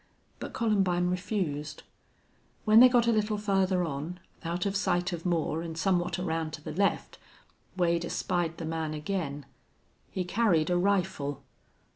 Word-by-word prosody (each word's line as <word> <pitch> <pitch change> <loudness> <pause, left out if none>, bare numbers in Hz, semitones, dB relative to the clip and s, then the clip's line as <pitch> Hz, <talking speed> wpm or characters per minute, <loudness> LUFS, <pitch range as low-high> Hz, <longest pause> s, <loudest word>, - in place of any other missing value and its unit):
But - - -6
Columbine 190 -6 +1
refused. 160 -6 -3 0.8
When 215 +1 +7
they 255 +1 +9
got 245 -2 +4
a 235 - +3
little 215 -1 +1
farther 195 -3 +1
on, 160 +4 -5 0.2
out 175 +2 -2
of 200 0 -1
sight 180 -3 0
of 170 +1 -4
Moore 165 -2 0
and 165 -1 -6
somewhat 175 0 +1
around 165 -3 -2
to 155 - -7
the 155 - -5
left, 200 +4 0 0.6
Wade 170 -1 +2
espied 170 -1 -1
the 165 - -5
man 160 -1 -3
again. 150 -3 -3 0.6
He 185 - -2
carried 180 -4 +2
a - - +3
rifle. 185 -7 0
175 Hz, 150 wpm, -29 LUFS, 160-195 Hz, 0.8 s, they